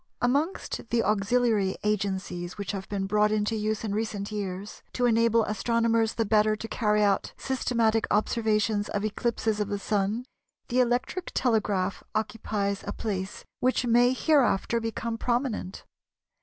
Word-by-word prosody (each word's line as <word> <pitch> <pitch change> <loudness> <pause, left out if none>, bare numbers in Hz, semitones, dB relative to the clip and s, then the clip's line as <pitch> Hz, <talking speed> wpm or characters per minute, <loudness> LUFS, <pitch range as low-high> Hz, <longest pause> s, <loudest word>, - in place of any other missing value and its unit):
Amongst 280 -1 -1
the 235 -1 +2
auxiliary 210 0 +2
agencies 190 -4 -2
which 200 -1 -3
have 195 -2 -6
been 195 -1 -2
brought 210 +1 +2
into 215 +1 0
use 215 0 -1
in 210 -3 -2
recent 210 -1 -3
years, 200 -1 -5
to 250 - +1
enable 230 -1 +4
astronomers 230 +1 +1
the 225 - +1
better 215 0 +3
to 220 +1 -6
carry 210 -2 +1
out 200 -2 +1
systematic 230 -4 +1
observations 215 -1 +1
of 205 +1 -2
eclipses 220 0 -1
of 210 - 0
the 205 0 -2
Sun, 205 +4 -1 0.4
the 250 - +1
electric 250 +9 0
telegraph 205 -6 +1
occupies 210 -2 -2
a - - -1
place 195 -3 -4
which 255 0 +1
may 240 +1 +5
hereafter 255 -6 +2
become 225 0 -3
prominent. 240 -6 -2
215 Hz, 140 wpm, -27 LUFS, 205-235 Hz, 0.4 s, may